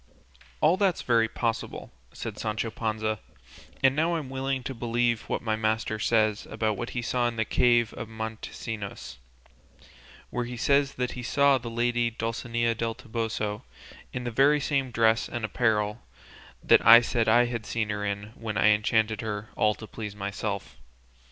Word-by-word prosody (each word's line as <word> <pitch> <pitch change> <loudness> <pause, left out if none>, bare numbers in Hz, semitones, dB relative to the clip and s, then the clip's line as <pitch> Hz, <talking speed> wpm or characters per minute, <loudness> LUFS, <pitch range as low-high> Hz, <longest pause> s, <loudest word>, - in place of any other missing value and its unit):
"All 160 +4 +4
that's 190 -3 +1
very 115 -2 +3
possible," 115 0 -3 0.2
said - - -7
Sancho 110 +1 -2
Panza; 110 -1 -2 0.6
"and 135 0 +5
now 165 +3 +1
I'm 145 -5 -4
willing 135 0 -2
to 135 - -4
believe 120 -1 0
what - - -2
my 110 -2 0
master 110 0 -1
says 110 -1 +1
about 110 -1 -1
what 120 - -4
he 120 - -1
saw 120 0 +1
in 120 - -3
the 110 -1 0
cave 120 -1 +3
of 115 -2 -7
Montesinos, 110 - -6 1.1
where 125 -1 -2
he 120 0 -6
says 140 +3 +2 0.2
he 125 - -6
saw 140 +2 +3
the 120 -1 -6
lady 120 0 +1
Dulcinea 115 +1 -1
del 115 0 -2
Toboso 110 -2 -3 0.5
in 125 - -4
the 120 - -3
very 140 +5 +4
same 140 -2 0
dress 115 -1 +2
and 120 -2 -3
apparel 110 -1 0 0.6
that - - +5
I 115 +1 +10
said 115 -1 0
I 120 +2 +5
had 115 -2 -4
seen 110 -2 -1
her 105 0 -2
in 100 +1 -3
when 110 -4 -5
I 105 - +5
enchanted 110 0 +2
her 105 -1 -4
all 105 0 +2
to 110 - -9
please 105 -1 -7
myself. 100 0 -4
115 Hz, 165 wpm, -27 LUFS, 110-120 Hz, 1.1 s, I